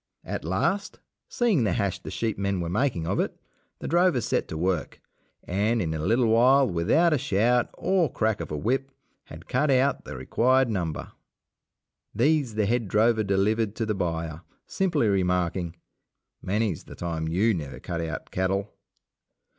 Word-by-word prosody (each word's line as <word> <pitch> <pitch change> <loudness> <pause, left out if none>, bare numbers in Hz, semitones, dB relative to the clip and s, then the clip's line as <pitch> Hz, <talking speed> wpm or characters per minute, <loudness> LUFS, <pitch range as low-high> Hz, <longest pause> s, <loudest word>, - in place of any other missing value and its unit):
At - - -5
last, 95 - -1 0.3
seeing 220 - +2
the 100 -5 +1
hash 100 -2 -1
the - - -8
sheep 115 -2 -2
men 100 -1 0
were 85 -1 -3
making 105 -6 0
of - - -1
it, - - -2 0.4
the - - -6
drovers 175 - +2
set - - 0
to 80 - -5
work, 90 -1 -1 0.4
and 105 +6 0
in 80 -6 -1
a 80 - -3
little 115 +10 +2
while, 130 +4 +5
without 110 - +2
a 150 - +1
shout, 120 0 +2
or 185 -6 +1
crack 110 -4 0
of 80 - -6
a 75 - -3
whip, 135 - -1 0.4
had - - -12
cut 140 +4 +1
out 135 +1 +2
the 75 - -7
required 125 - +2
number. 85 -6 -3 1.0
These 135 0 +2
the 110 -1 +1
head 115 +1 0
drover 110 +2 +3
delivered 100 +2 +1
to 115 - -2
the 110 - 0
buyer, 85 -4 -3 0.2
simply 165 - 0
remarking, 90 -3 0 0.7
"Many's 100 -2 -1
the - - -11
time 80 -2 -3
you 100 +8 +2
never 70 -7 -5
cut 85 +3 -4
out 80 0 -5
cattle." 95 +2 -1
105 Hz, 165 wpm, -26 LUFS, 85-125 Hz, 1.0 s, while